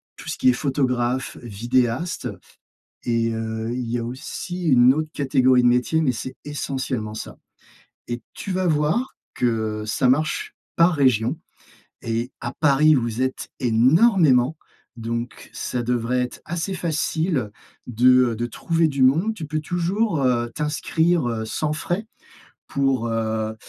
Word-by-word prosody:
tout - - -9
ce - - -3
qui - - +4
est - - +5
photographe, 130 -2 -1
vidéaste 120 - -1 0.8
et 115 -1 +1
heu, 110 0 -3
il 120 -1 -3
y 120 - 0
a 115 - -3
aussi 175 +8 -6
une 125 -1 +6
autre 155 +1 -2
catégorie 130 -3 +3
de - - +4
métiers, 125 +6 +2
mais 130 -5 +2
c'est 130 +2 -6
essentiellement 130 -6 -3
ça, 110 - -7 0.7
et 120 0 -4
tu 195 - -5
vas 185 0 0
voir 160 - +1 0.2
que 110 -3 -1
ça 115 +5 +1
marche 155 - 0 0.2
par 170 +2 +5
région 130 0 +2 0.6
et 115 +2 -2
à 120 - -3
Paris, 150 +1 +5
vous 120 -2 -1
êtes 130 0 -2
énormément, 135 - +4 0.4
donc 115 +1 -5
ça 125 -1 -3
devrait 120 +1 0
être 125 - -7
assez 175 +3 -3
facile 160 - -1 0.4
de 125 +1 +4
de 120 +2 -2
trouver 165 +5 0
du 140 -3 +1
monde. 165 +12 +3
Tu 165 -7 -6
peux 155 +1 -2
toujours, 175 +2 0
heu, 120 -2 +1
t'inscrire, 160 +1 0
heu, 115 -2 -2
sans 150 +7 -2
frais, 175 +7 -3 0.6
pour, 135 -4 0
heu 110 -1 -1
130 Hz, 145 wpm, -23 LUFS, 120-155 Hz, 0.8 s, une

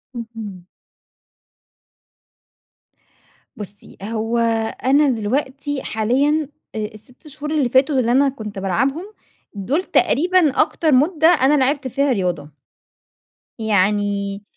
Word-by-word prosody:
اهم. 220 -6 -8 2.9
بُصّي. 205 -1 -11
هو 225 +2 -2 0.5
أنا 280 +2 +4
دلوقتي 265 +5 -2
حاليًا 275 +8 0 0.3
آآ، - - -4 0.2
ال6 250 +8 -17
شهور 300 +1 -6
اللي 285 -6 +1
فاتوا، 265 +2 +3
اللي 235 -1 +1
أنا 275 +2 +4
كنت 215 -6 -7
بالعبهم 265 - -1 0.5
دول 260 - -1
تقريبًا 345 -4 +2
أكتر 315 0 0
مدة 310 +4 +3
أنا 295 -4 +4
لعبت 270 +1 0
فيها 280 +2 0
رياضة. 175 - -2 1.1
يعني 205 -1 0
255 Hz, 100 wpm, -20 LUFS, 210-290 Hz, 2.9 s, أنا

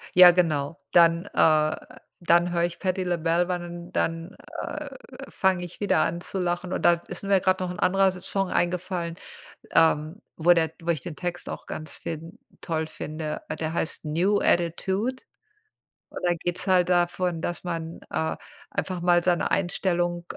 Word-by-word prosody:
Ja, 180 0 +10
genau. 165 -4 0
Dann, 170 +1 +5
äh 155 -1 +4 0.5
dann 175 +1 +3
höre 170 -1 +1
ich 175 -1 -6
Patti 185 0 -1
LaBelle 170 0 +1
ban 180 -1 -3
und 175 0 -8
dann, 165 +2 -2 0.3
äh, - - -5 0.4
fange 190 -2 +1
ich 175 - -9
wieder 205 - +2
an 170 +1 0
zu 180 - -5
lachen, 175 0 -2
und - - -2
da 175 - +7
ist - - -4
mir 195 -1 +3
grad 185 0 +1
noch 180 -1 -2
'n 180 - -8
anderer 195 +1 +3
Song 195 +1 -1
eingefallen, 175 -1 -1 0.6
ähm, 160 +4 +2 0.2
wo 175 +2 +6
der 160 -2 +1
wo 170 - -9
ich 160 -4 0
den 170 - -6
Text 175 +2 -4
auch - - -7
ganz 155 - -6
fin 165 +1 -7 0.2
toll 160 -1 -2
finde. 155 0 -5 0.2
Der 160 0 -2
heißt 165 -1 -2
„New 180 +7 +2
Attitude“, 190 +9 +1 0.9
und - - -9
da 175 - +3
geht's 175 +3 -3
halt 185 -2 +4
davon, 175 -1 +1
dass 175 +2 -3
man, 165 -1 -4
äh, 160 0 -1 0.3
einfach 185 -2 -3
mal 175 0 +3
seine 175 -2 +1
Einstellung 175 -1 0
175 Hz, 170 wpm, -26 LUFS, 165-180 Hz, 0.9 s, Ja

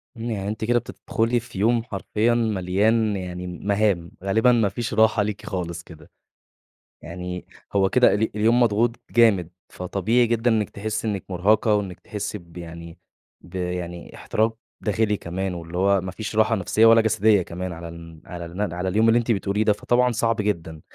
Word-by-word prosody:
يعني 110 -4 -4
أنتِ 110 +1 -3
كده 120 +1 +3
بتدخلي 115 0 -1
في 105 -4 -9
يوم 115 +2 +2
حرفيًا 110 +1 0
مليان 110 0 +1
يعني 90 -1 -5
مهام، 100 -1 0
غالبًا 110 +5 +3
ما 115 -4 +3
فيش 115 +3 -4
راحة 110 -1 +4
ليكِ 105 0 -5
خالص 85 -3 -4
كده، 80 -2 -15 0.9
يعني 90 +2 -6 0.3
هو 95 -1 +3
كده 125 -1 +5
ال 110 +2 +1
اليوم 115 +3 +3
مضغوط 115 +2 +1
جامد، 105 -8 +4 0.2
فطبيعي 110 +6 0
جدًا 115 +1 +1
إنِّك 110 -2 +1
تحسّي 110 +2 -4
إنِّك 100 -3 -2
مُرهقة 105 +4 +3
وإنِّك 95 -4 -3
تحسّي 105 -1 -5
ب 85 -1 -15
يعني 85 0 -9 0.4
ب 90 +2 -14
يعني 90 -1 -5
احتراق 110 +1 -1 0.2
داخلي 105 0 0
كمان، 95 +2 -4
واللي 85 0 -7
هو 100 0 +3
ما 95 0 -5
فيش 110 +1 -6
راحة 110 +1 +3
نفسيّة 110 +3 +2
ولا 115 0 +7
جسدية 110 -2 +3
كمان، 90 +1 -5
على 85 0 -8
ال 85 -1 -11
على 85 -1 -7
الم 90 +5 -6
على 90 +1 -2
اليوم 110 +4 +3
اللي 115 +1 +5
أنتِ 120 0 -1
بتقوليه 100 +1 0
ده، 105 - +3
فطبعًا 125 +4 +2
صعب 115 0 +1
جدًا. 85 -7 -3
105 Hz, 175 wpm, -23 LUFS, 90-110 Hz, 0.9 s, ولا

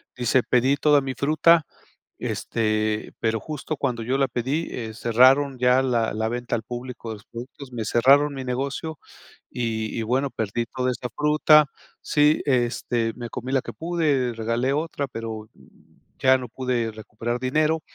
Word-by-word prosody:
dice: 125 +1 +2
"Pedí 130 +3 +2
toda 145 0 +4
mi 135 -1 -4
fruta, 155 +2 +4 0.5
este, 110 -1 -1
pero 110 0 0
justo 155 0 -5
cuando 125 -4 -2
yo 125 +4 -1
la 135 - +3
pedí, 130 +7 -2
eh, 110 -3 -5
cerraron 130 +4 +4
ya 125 +1 +4
la 120 -4 0
la 110 +1 -1
venta 120 +1 -4
al 110 - -2
público 120 0 -7
de 110 - -4
los 105 - -16
productos, 130 +3 -10
me 115 -2 -3
cerraron 140 +6 +4
mi 135 -1 -5
negocio 140 +4 -3 0.5
y 110 -2 -3
y - - -1
bueno 130 +5 0
perdí 110 +2 -2
toda 130 +1 -1
esta 125 0 -4
fruta, 150 0 +5 0.4
sí, 150 +1 +3
este, 120 -3 0
me 120 -1 -7
comí 130 +3 -6
la 135 - +3
que - - -8
pude, 155 -7 0
regalé 115 +4 -1
otra, 150 -1 -2
pero, 115 -3 -6 0.8
ya 130 0 +6
no 125 -2 -7
pude 125 -3 -2
recuperar 110 +2 -5
dinero, 155 +5 +1
125 Hz, 165 wpm, -24 LUFS, 115-140 Hz, 0.8 s, ya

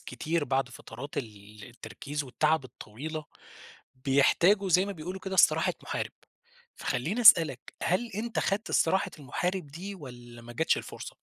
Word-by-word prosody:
كتير 165 0 -2
بعد 135 -1 0
فترات 135 +3 -8
ال 105 -3 -9
التركيز 140 +5 -6
والتعب 150 +3 +1
الطويلة، 150 +6 -7 0.8
بيحتاجوا 175 +9 +4
زي 185 +2 +4
ما 200 - -4
بيقولوا 180 +2 -7
كده 190 0 -5
استراحة - - +4
محارب، - - -4 0.6
فخلّيني 170 - -2
أسأل 170 -8 +9
لك 130 -3 -10
هل 210 +7 0
أنت 225 +3 -3
خدت 200 +3 -1
استراحة 190 +4 +2
المحارب 175 +6 -3
دي 185 +7 -7
والّا 120 -7 -11
ما 120 +1 -10
جاتش 160 +7 +2
الفرصة؟ - - -8
155 Hz, 145 wpm, -29 LUFS, 125-190 Hz, 0.8 s, أسأل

